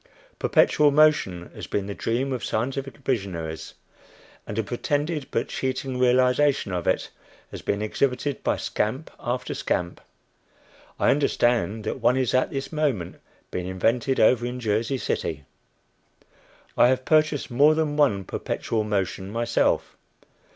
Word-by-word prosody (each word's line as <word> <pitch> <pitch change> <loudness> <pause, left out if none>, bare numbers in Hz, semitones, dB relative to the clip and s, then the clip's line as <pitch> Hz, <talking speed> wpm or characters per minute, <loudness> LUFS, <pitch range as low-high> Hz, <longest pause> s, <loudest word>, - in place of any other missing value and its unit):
Perpetual 150 -1 +4
motion 145 - +3
has - - -8
been 100 - -2
the 100 - -4
dream 125 +6 -1
of 125 - -4
scientific 135 +4 -2
visionaries, 95 -12 -3 0.7
and 105 - -5
a 110 - +1
pretended 145 +7 -2
but 115 - -1
cheating 130 0 -3
realization 125 -2 +3
of 90 -1 -3
it - - 0 0.4
has - - -7
been 100 +1 -1
exhibited 135 +5 -1
by - - +1
scamp 130 +9 -2
after 125 +1 -3
scamp. 85 0 -2 1.0
I - - +4
understand 120 -6 +1
that 110 - -3
one 125 - +3
is 130 -3 0
at 130 - +2
this 135 0 -5
moment 140 - -2 0.3
being 90 0 -3
invented 115 +8 0
over 120 +2 +4
in 125 +1 -3
Jersey 115 +3 0
City. 75 - -3 1.3
I - - +6
have 130 0 +1
purchased 155 -3 +2
more 145 +5 +5
than 155 -2 0
one 135 -10 +2
"perpetual 110 +4 -2
motion" 100 -2 -2
myself. 115 +2 0
125 Hz, 135 wpm, -25 LUFS, 105-140 Hz, 1.3 s, I